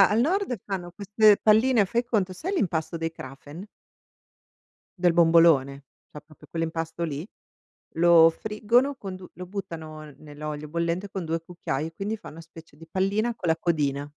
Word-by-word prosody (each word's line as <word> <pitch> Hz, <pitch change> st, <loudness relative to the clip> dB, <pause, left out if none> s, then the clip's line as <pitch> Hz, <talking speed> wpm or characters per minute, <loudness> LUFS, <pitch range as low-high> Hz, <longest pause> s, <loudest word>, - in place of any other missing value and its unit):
Da 195 Hz, -, +7 dB
al 210 Hz, -, +2 dB
nord 340 Hz, 0 st, 0 dB
fanno 180 Hz, -3 st, -5 dB
queste 210 Hz, +1 st, +4 dB
palline, 220 Hz, +1 st, +4 dB
fai 235 Hz, +5 st, -1 dB
conto, 205 Hz, -6 st, 0 dB
sai 360 Hz, -, -4 dB
l'impasto 170 Hz, -, -1 dB
dei 165 Hz, 0 st, -3 dB
Krapfen? 145 Hz, +5 st, -10 dB, 1.3 s
Del 175 Hz, -1 st, +3 dB
bombolone, 165 Hz, -5 st, +4 dB, 0.3 s
cioè 150 Hz, -, -11 dB
proprio 155 Hz, -1 st, -19 dB
quell'impasto 165 Hz, 0 st, -3 dB
lì, 155 Hz, +2 st, -4 dB, 0.7 s
lo 165 Hz, 0 st, +7 dB
friggono 220 Hz, +9 st, 0 dB
con 195 Hz, -7 st, -7 dB
du 185 Hz, -, -12 dB
lo 180 Hz, -, -8 dB
buttano 160 Hz, -6 st, -8 dB
nell'olio 150 Hz, 0 st, -7 dB
bollente, 170 Hz, +4 st, -2 dB
con 190 Hz, -3 st, -5 dB
2 165 Hz, +1 st, -2 dB
cucchiai 165 Hz, -3 st, -4 dB
e 165 Hz, -, -12 dB
quindi 200 Hz, +6 st, -3 dB
fa 220 Hz, -, -11 dB
una 160 Hz, -, -12 dB
specie 165 Hz, -2 st, -14 dB
di 165 Hz, +1 st, -14 dB
pallina 205 Hz, +6 st, 0 dB
con 175 Hz, -, -3 dB
la 160 Hz, -, +2 dB
codina. 145 Hz, -5 st, -1 dB
170 Hz, 165 wpm, -25 LUFS, 160-205 Hz, 1.3 s, Da